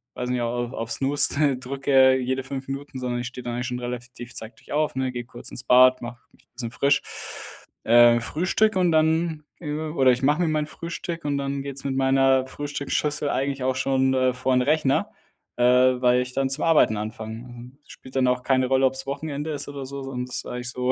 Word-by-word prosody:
weiß 125 Hz, -, -4 dB
ich -, -, 0 dB
nicht- 125 Hz, -, -1 dB
auch 120 Hz, +1 st, -2 dB
auf 115 Hz, 0 st, -5 dB
Snooze 140 Hz, 0 st, +1 dB
drücke 130 Hz, 0 st, +3 dB
jede 130 Hz, +1 st, -2 dB
5 135 Hz, +1 st, -6 dB
Minuten, 135 Hz, 0 st, -6 dB
sondern 120 Hz, -1 st, -2 dB
ich -, -, -5 dB
stehe 125 Hz, +1 st, -8 dB
da -, -, -5 dB
eigentlich 125 Hz, +1 st, -3 dB
schon 125 Hz, 0 st, -4 dB
relativ, 120 Hz, 0 st, -7 dB
zeitig 110 Hz, +2 st, -10 dB
auf, 150 Hz, 0 st, +1 dB
ne, 130 Hz, -1 st, -1 dB
gehe 120 Hz, -1 st, -5 dB
kurz 120 Hz, 0 st, -8 dB
ins 125 Hz, -, -5 dB
Bad, 130 Hz, 0 st, +6 dB
mach 120 Hz, +1 st, -9 dB
mich -, -, -26 dB
'n -, -, -62 dB
bisschen 120 Hz, -1 st, -5 dB
frisch. 140 Hz, +3 st, +2 dB, 0.8 s
Äh, 120 Hz, +1 st, +6 dB
frühstücke 185 Hz, -, 0 dB
und 180 Hz, -2 st, +3 dB
dann 160 Hz, 0 st, +2 dB, 0.2 s
oder 150 Hz, -3 st, +1 dB
ich 125 Hz, -, 0 dB
mache 150 Hz, +5 st, +3 dB
mir 175 Hz, -, +2 dB
mein 155 Hz, -1 st, 0 dB
Frühstück 170 Hz, 0 st, -6 dB
und 145 Hz, -1 st, 0 dB
dann 140 Hz, 0 st, -3 dB
geht's 140 Hz, -1 st, -7 dB
mit 135 Hz, -1 st, -1 dB
meiner 135 Hz, 0 st, +3 dB
Frühstücksschüssel 145 Hz, +1 st, -2 dB
eigentlich 135 Hz, 0 st, -1 dB
auch 130 Hz, 0 st, +1 dB
schon, 130 Hz, 0 st, +1 dB
äh, 130 Hz, -1 st, +2 dB
vor 125 Hz, +1 st, -1 dB
den 125 Hz, -, +3 dB
Rechner, 140 Hz, 0 st, +1 dB, 0.5 s
äh, 120 Hz, -, +1 dB
weil 125 Hz, 0 st, +4 dB
ich 125 Hz, 0 st, -5 dB
dann 135 Hz, 0 st, +1 dB
zum 135 Hz, +3 st, -2 dB
Arbeiten 155 Hz, -9 st, +4 dB
anfange. 115 Hz, +3 st, -7 dB, 0.2 s
Spielt 130 Hz, +1 st, -14 dB
dann 130 Hz, -1 st, +3 dB
auch 125 Hz, 0 st, 0 dB
keine 130 Hz, -1 st, +2 dB
Rolle, 135 Hz, +1 st, +3 dB
ob's 130 Hz, +1 st, -1 dB
Wochenende 145 Hz, +2 st, -4 dB
ist 145 Hz, -1 st, -5 dB
oder 140 Hz, -1 st, -6 dB
so, 140 Hz, 0 st, -6 dB
sondern 130 Hz, -2 st, -4 dB
das 125 Hz, -, -7 dB
ist -, -, -5 dB
eigentlich 125 Hz, 0 st, -5 dB
so 125 Hz, 0 st, -1 dB
130 Hz, 210 wpm, -24 LUFS, 125-140 Hz, 0.8 s, Bad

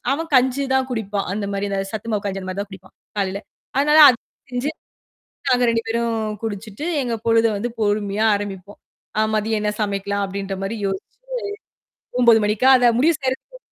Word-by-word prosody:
அவன் 325 Hz, +3 st, -2 dB
கஞ்சி 260 Hz, +2 st, +4 dB
தான் 265 Hz, 0 st, +2 dB
குடிப்பான். 210 Hz, -4 st, -2 dB
அந்தமாரி 200 Hz, 0 st, -2 dB
அந்த 195 Hz, -, 0 dB
சத்துமாவு 215 Hz, -1 st, -3 dB
கஞ்சிமாரிதான் 195 Hz, 0 st, -4 dB
குடிப்பான் 190 Hz, -1 st, -13 dB, 0.2 s
காலையில. 195 Hz, 0 st, -1 dB, 0.4 s
அதனால 300 Hz, +2 st, +5 dB
அத 250 Hz, -, +5 dB, 0.3 s
செஞ்சு 250 Hz, +4 st, -1 dB, 0.8 s
நாங்க 250 Hz, -1 st, +4 dB
2 230 Hz, 0 st, +1 dB
பேரும் 225 Hz, -2 st, -1 dB
குடிச்சிட்டு 215 Hz, +4 st, -5 dB, 0.2 s
எங்க 245 Hz, -3 st, -2 dB
பொழுத 225 Hz, -1 st, +2 dB
பொறுமையா 205 Hz, 0 st, +1 dB
ஆரம்பிப்போம். 200 Hz, -1 st, -6 dB, 0.4 s
ஆ -, -, +5 dB
மதியம் 215 Hz, 0 st, 0 dB
என்ன 210 Hz, 0 st, 0 dB
சமைக்கலாம் 200 Hz, 0 st, -1 dB
அப்பிடின்ற 195 Hz, 0 st, -4 dB, 0.2 s
யோசிச்சு, 195 Hz, 0 st, -6 dB, 1.1 s
9:00 230 Hz, -2 st, +7 dB
மணிக்கா 215 Hz, +5 st, +2 dB
அதை 245 Hz, -1 st, +5 dB
முடிவு 325 Hz, +5 st, +4 dB
செய்றக்கு 265 Hz, -, -3 dB
215 Hz, 140 wpm, -21 LUFS, 200-245 Hz, 1.1 s, 9:00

